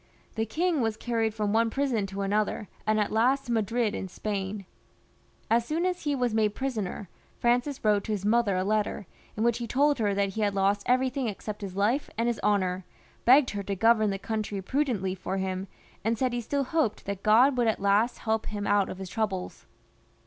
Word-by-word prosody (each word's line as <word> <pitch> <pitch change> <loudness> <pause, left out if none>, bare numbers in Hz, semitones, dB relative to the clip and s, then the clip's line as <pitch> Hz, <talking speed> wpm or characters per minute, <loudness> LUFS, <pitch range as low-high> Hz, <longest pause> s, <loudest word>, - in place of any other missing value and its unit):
The 225 0 -2
king 325 - 0
was 225 -2 -1
carried 225 -2 0
from 210 -1 -1
one 230 +1 +3
prison 245 -6 0
to 195 +1 -5
another, 210 +1 0 0.2
and 215 0 +3
at 210 - 0
last 250 +5 +2
to 240 - -4
Madrid 225 0 +1
in 190 - -4
Spain. 195 +1 -4 0.8
As 230 +1 +3
soon 315 +8 -1
as 360 -3 -2
he 290 -1 +1
was 245 -4 0
made 215 -2 +1
prisoner, 215 -7 -3 0.3
Francis 245 +2 0
wrote 205 -2 +3
to 220 - -3
his 200 -2 -2
mother 215 -3 +2
a 185 - +1
letter, 210 0 -1 0.3
in 215 - 0
which 235 0 +2
he 235 - -4
told 285 +3 +2
her 205 -3 +1
that 200 0 +1
he 215 +3 -4
had 205 -1 +1
lost 200 +1 +2
everything 255 0 +1
except 210 0 -5
his 190 -2 -6
life 230 +9 +1
and 230 - +1
his 240 -1 -1
honour, 190 -3 +1 0.4
begged 260 +2 +6
her 205 - -3
to 200 0 -3
govern 215 +1 +4
the 195 - -1
country 215 -1 -3
prudently 215 -4 -1
for 190 +1 -4
him, 190 0 -3 0.4
and 225 +2 +1
said 255 +1 0
he 240 - -1
still 280 +4 -1
hoped 265 -5 -1
that 200 -1 -4
God 240 +7 +5
would 240 -2 +2
at 220 - +1
last 200 +4 +2
help 220 -1 -1
him 205 -1 -4
out 205 -1 +2
of - - -6
his 190 0 -6
troubles. 195 -2 -3
215 Hz, 210 wpm, -28 LUFS, 200-240 Hz, 0.8 s, begged